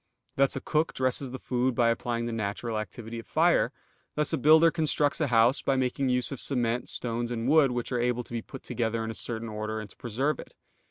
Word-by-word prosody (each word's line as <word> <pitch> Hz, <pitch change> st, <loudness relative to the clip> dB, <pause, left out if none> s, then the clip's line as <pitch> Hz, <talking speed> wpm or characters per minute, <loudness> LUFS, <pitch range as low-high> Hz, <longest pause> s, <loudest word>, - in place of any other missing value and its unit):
Thus 135 Hz, 0 st, +2 dB
a 135 Hz, -, -3 dB
cook 155 Hz, +2 st, 0 dB
dresses 130 Hz, +1 st, 0 dB
the 130 Hz, -, -6 dB
food 125 Hz, 0 st, -1 dB
by 120 Hz, -1 st, +3 dB
applying 115 Hz, 0 st, -2 dB
the 120 Hz, -, -3 dB
natural 110 Hz, +1 st, -3 dB
activity 110 Hz, +3 st, -7 dB
of 115 Hz, -, -11 dB
fire; -, -, +3 dB, 0.4 s
thus 150 Hz, -1 st, +1 dB
a -, -, +2 dB
builder 160 Hz, +4 st, +6 dB
constructs 155 Hz, -2 st, +1 dB
a 150 Hz, -, +2 dB
house, 120 Hz, +2 st, +4 dB
by 135 Hz, -, +1 dB
making 130 Hz, +1 st, 0 dB
use 125 Hz, +1 st, 0 dB
of 135 Hz, -, -3 dB
cement, 120 Hz, -3 st, +1 dB
stones, 120 Hz, 0 st, -2 dB
and 120 Hz, 0 st, -3 dB
wood 150 Hz, -1 st, +5 dB
which 120 Hz, 0 st, -3 dB
are 125 Hz, -1 st, 0 dB
able 125 Hz, 0 st, 0 dB
to 120 Hz, -, -13 dB
be 115 Hz, -, -2 dB
put 135 Hz, +3 st, -11 dB
together 115 Hz, -1 st, -2 dB
in 110 Hz, -, -3 dB
a -, -, -6 dB
certain 115 Hz, +1 st, -4 dB
order 110 Hz, 0 st, -4 dB
and 105 Hz, -2 st, -8 dB
to -, -, -18 dB
preserve 130 Hz, +6 st, -1 dB
it. -, -, -11 dB
120 Hz, 230 wpm, -28 LUFS, 115-135 Hz, 0.4 s, builder